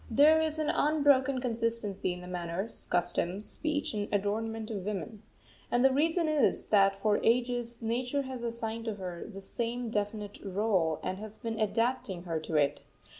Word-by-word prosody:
There 300 +7 +6
is 315 -1 -1
an 310 -1 +1
unbroken 280 -3 +3
consistency 230 -5 -1
in 180 0 -6
the 180 - -9
manners, 180 +3 -4
customs, 175 +3 0
speech, 300 -4 -2
and 205 -1 -3
adornment 220 +2 -1
of 200 -4 -4
woman. 210 +1 -4 0.5
And 245 +2 +3
the 270 - +5
reason 325 +4 +2
is, 305 -3 +2
that 195 -2 +5
for 205 +1 +1
ages 240 0 +1
Nature 250 +5 0
has 260 -2 -6
assigned 230 -1 -3
to 220 -2 -2
her 180 -3 -6
the 195 -1 -8
same 235 +3 -3
definite 205 -1 -3
rôle 190 -5 +1
and 185 - -3
has 215 0 -8
been 225 -1 -4
adapting 220 -4 0
her 165 -3 -2
to 155 +1 -5
it. 145 -1 +2
225 Hz, 170 wpm, -30 LUFS, 195-250 Hz, 0.5 s, There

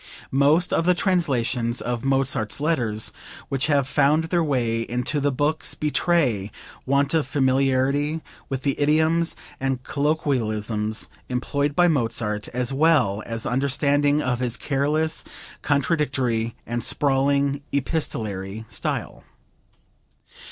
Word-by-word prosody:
Most 145 +6 +3
of 165 - +1
the 180 - +5
translations 130 - 0
of 120 -1 -3
Mozart's 135 -5 0
letters 120 -9 -1 0.4
which 135 +1 0
have 140 -3 +2
found 145 +2 +3
their 170 +1 +1
way 120 -6 0
into 125 +5 -2
the 145 0 +1
books 145 +4 0
betray 145 - +1 0.4
want 140 +2 +2
of 160 -4 +1
familiarity 135 +3 +1 0.3
with 135 -2 -3
the 140 -2 -1
idioms 160 +3 +2 0.2
and 135 -1 -2
colloquialisms 110 -8 0 0.2
employed 140 +3 -1
by 175 +1 +5
Mozart, 115 -8 0
as 125 +1 -2
well 135 -9 +3
as 115 -1 -3
understanding 145 +3 +2
of 125 -1 -1
his 125 -1 -1
careless, 150 +3 0 0.4
contradictory 135 -6 0
and 120 0 -3
sprawling 140 0 +2
epistolary 110 - -2
style. - - -4
140 Hz, 115 wpm, -23 LUFS, 120-150 Hz, 0.4 s, the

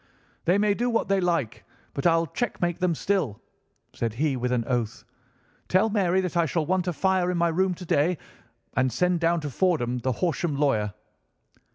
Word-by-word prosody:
"'They 180 +3 +4
may 205 0 +3
do 240 +4 -1
what 230 -3 0
they 195 -1 +3
like, 140 -11 -1 0.3
but 140 - +1
I'll 165 0 +3
checkmate 175 - -2
them 180 -3 +1
still,' 165 - -1 0.5
said 115 -2 -3
he 145 +2 +1
with 125 0 -2
an 120 -2 0
oath. 120 -4 -2 0.6
'Tell 200 +4 +3
Mary 190 -3 +2
that 180 -1 -4
I 170 -1 +3
shall 160 +1 0
want 185 +2 0
a 180 - 0
fire 190 +1 +1
in 180 - 0
my 170 0 +2
room 185 +2 +1
to 180 - -9
day, 160 +3 +2 0.6
and 130 -1 +2
send 180 +8 +1
down 170 0 +2
to 145 -2 -4
Fordham, 125 -6 +1
the 130 +2 -1
Horsham 170 0 -1
lawyer. 110 -8 +1
170 Hz, 190 wpm, -26 LUFS, 135-185 Hz, 0.6 s, They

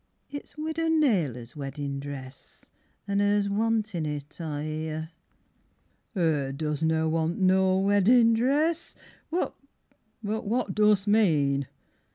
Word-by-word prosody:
It's 285 +1 -8
Widow 315 +1 -2
Naylor's 175 - +1
weddin' 140 -1 -4
dress, 140 -1 -10 0.4
An' 200 0 +1
'er's 205 0 +2
wantin 210 -5 0
it, 150 +2 -6
I 150 -2 -3
hear. 155 +1 -4 1.1
'Er 150 -6 +1
doesna 160 +2 0
want 160 +1 0
no 190 0 +3
weddin 205 +4 +4
dress... 295 +8 +1 0.3
What 345 +3 -1 0.7
but 220 +3 -2
what 220 -3 0
dost 210 -1 +3
mean? 150 - +3
185 Hz, 110 wpm, -27 LUFS, 150-220 Hz, 1.1 s, weddin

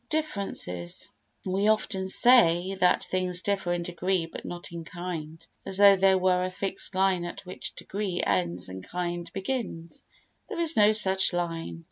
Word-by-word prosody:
Differences 200 - -2 0.4
We 195 +2 0
often 200 -3 0
say 190 -6 +5
that 180 -1 +3
things 185 -1 +1
differ 195 -3 -1
in 175 -1 -3
degree 175 0 -2
but 165 - -10
not 175 0 -6
in 170 -1 -7
kind, 165 -2 -8 0.2
as 190 - +2
though 200 0 +7
there 190 0 +3
were 180 -1 +1
a 185 - -2
fixed 195 0 -1
line 190 -2 +1
at 175 +2 -8
which 185 - -7
degree 195 -3 -5
ends 90 0 -1
and 95 0 -8
kind 175 -1 -5
begins. 195 -5 -5 0.5
There - - -6
is 330 -1 +3
no 210 0 +5
such 190 -3 +5
line. 165 -1 -4
185 Hz, 160 wpm, -26 LUFS, 170-195 Hz, 0.5 s, though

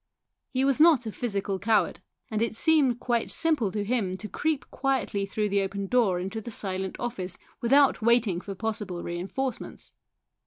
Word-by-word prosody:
He 260 0 0
was 275 0 +2
not 305 -6 +6
a 220 - -3
physical 200 -4 -2
coward, 220 +2 +2 0.3
and 215 0 -1
it 230 -1 0
seemed 275 -3 +3
quite 240 -2 0
simple 300 - +1
to 210 0 -2
him 205 -4 -1
to 215 - -7
creep 300 - -1
quietly 260 -7 -1
through 210 +1 -1
the 200 0 +2
open 195 +1 -3
door 200 -5 +2
into 195 +5 -4
the 235 - -7
silent 190 -3 -3
office 190 -7 -4 0.2
without 275 +3 +4
waiting 220 -6 +3
for 195 0 -7
possible 210 -4 -4
reinforcements. 195 +9 -4
220 Hz, 165 wpm, -27 LUFS, 195-250 Hz, 0.3 s, not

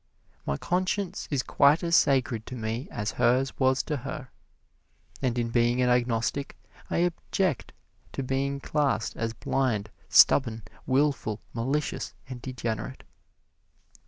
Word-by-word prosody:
My 70 - 0
conscience 185 - -1
is 140 -4 0
quite 145 +5 +4
as 170 0 +3
sacred 130 -7 +2
to 130 - -6
me 115 +2 -3
as 105 +1 -3
hers 130 +2 +2
was 130 0 +3
to 150 - -2
her. 135 0 -7 0.9
And 125 -3 0
in 120 -1 0
being 120 +1 +2
an 125 -1 +3
agnostic 125 +3 0 0.3
I - - -1
object 175 -3 -2 0.4
to 135 - -3
being 135 +2 -1
classed 140 -8 0
as 115 0 -2
blind, 110 -3 -1 0.2
stubborn, 115 -5 +5 0.2
wilful, 135 -5 +1
malicious 135 +6 -2
and 125 -2 -7
degenerate. 120 -1 -4
130 Hz, 130 wpm, -27 LUFS, 115-140 Hz, 0.9 s, stubborn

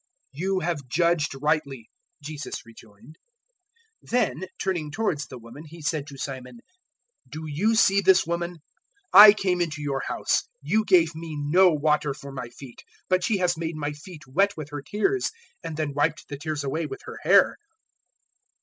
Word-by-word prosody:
"You 185 +7 -1
have 155 -5 -3
judged 165 +1 +1
rightly," 140 -6 -1 0.4
Jesus 150 -3 -6
rejoined. 115 - -17 0.8
007:044 - - -18
Then 235 -5 0
turning 175 -6 -2
towards 150 -3 -2
the 130 - -9
woman 120 +5 -12
He 165 +1 -12
said 155 -2 -2
to 140 -2 -10
Simon, 130 -3 -7 0.7
"Do 155 +4 -7
you 185 +10 +1
see 200 -2 +4
this 190 0 +5
woman? 170 +1 -3 0.6
I 205 +2 +12
came 185 -4 0
into 155 -3 -2
your 140 -2 -2
house: - - 0
you 220 - +1
gave 170 -4 +4
me 160 -1 -7
no 175 +6 +5
water 150 -2 +1
for 140 0 -10
my 125 -3 -6
feet; 125 0 -13 0.3
but 185 -1 +2
she 215 +1 +1
has 180 -2 +1
made 165 0 -4
my 145 -1 -3
feet 155 +2 -12
wet 195 +10 +1
with 150 -2 -7
her 145 -1 -5
tears, 365 - 0 0.3
and 160 -2 -6
then 155 -2 -2
wiped 150 +2 0
the 145 - -5
tears 150 -1 -3
away 155 +4 -2
with 135 - -8
her - - -8
hair. - - +4
155 Hz, 170 wpm, -25 LUFS, 145-180 Hz, 0.8 s, I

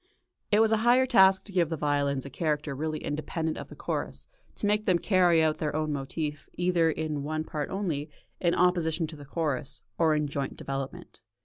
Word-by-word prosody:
It 210 +1 +5
was 225 0 +4
a 220 - +4
higher 240 +4 +4
task 190 -7 +5
to 205 - -11
give 175 -4 +2
the 165 - -2
violins 140 -2 0
a 140 - -8
character 150 0 -1
really 155 +3 -2
independent 155 +2 -2
of - - -7
the - - -10
chorus - - -4 0.3
to - - -3
make 210 +1 +1
them 185 -3 +4
carry 175 -3 +4
out 155 -1 +1
their 150 -1 -2
own 155 -1 0
motif 145 +2 -4
either 175 -2 +2
in 155 -2 -2
one 155 +2 -2
part 150 -2 -4
only, 170 -7 -2 0.3
in 170 -1 +2
opposition 170 -2 +2
to 160 0 -8
the 145 -1 -11
chorus, 145 -2 -3 0.2
or 160 -2 +4
in 150 -1 0
joint 140 -1 -4
development. 135 -1 -6
160 Hz, 200 wpm, -28 LUFS, 145-180 Hz, 0.3 s, It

